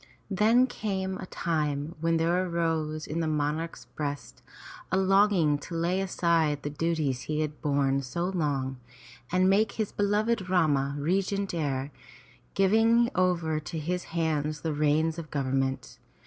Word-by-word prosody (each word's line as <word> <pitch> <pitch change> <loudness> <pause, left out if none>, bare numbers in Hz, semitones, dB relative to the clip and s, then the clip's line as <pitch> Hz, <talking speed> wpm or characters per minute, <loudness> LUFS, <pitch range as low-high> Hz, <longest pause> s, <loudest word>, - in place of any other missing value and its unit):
Then 225 +6 +4
came 190 -6 -3
a - - -7
time 150 -3 -2
when 165 0 +2
there 170 +3 +2
arose 160 -2 -1
in 160 - -3
the 165 - 0
monarch's 155 +2 -2
breast 145 -2 -6 0.5
a 185 - +2
longing 190 -6 +3
to 170 - -7
lay 175 +3 0
aside 165 -6 +1
the 145 - -3
duties 150 -4 -1
he 155 0 -2
had 150 -1 -4
borne 140 -2 +1
so 170 +7 -3
long, 145 -8 -1 0.5
and 185 +1 +3
make 200 +2 +3
his 220 -3 -2
beloved 205 0 0
Rama 145 -6 +2
regent 195 +6 0
heir, 140 -4 -2 0.6
giving 225 +5 +4
over 175 -4 +1
to 155 +2 -6
his 175 +4 -2
hands 155 -3 -1
the 160 -2 -2
reins 155 +2 +1
of 155 -2 -8
government. 135 -1 -2
165 Hz, 145 wpm, -28 LUFS, 150-185 Hz, 0.6 s, Then